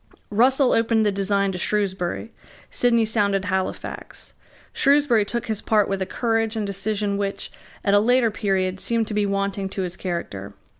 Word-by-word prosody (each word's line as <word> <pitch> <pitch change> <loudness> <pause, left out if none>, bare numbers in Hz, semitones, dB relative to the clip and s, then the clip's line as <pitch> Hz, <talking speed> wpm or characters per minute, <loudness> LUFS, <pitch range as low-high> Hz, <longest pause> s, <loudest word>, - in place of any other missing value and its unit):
Russell 255 +5 +4
opened 225 -1 +2
the 205 - +3
design 200 0 0
to 180 - -5
Shrewsbury. 195 +1 -1 0.4
Sidney 235 -2 +2
sounded 200 -2 +1
Halifax. 190 -1 -4 0.4
Shrewsbury 280 -6 +3
took 235 +3 -3
his 220 -2 -3
part 215 -2 +2
with 195 -1 -2
a 190 - -1
courage 225 -1 0
and 215 -2 -2
decision 200 +1 -2
which, 200 -1 -3 0.3
at 200 - +3
a 205 - +6
later 240 +1 +3
period, 190 -3 -1
seemed 230 0 0
to - - -4
be 210 -1 +1
wanting 200 0 -2
to 190 0 -3
his 175 -1 -4
character. 100 - -5
205 Hz, 165 wpm, -23 LUFS, 195-225 Hz, 0.4 s, a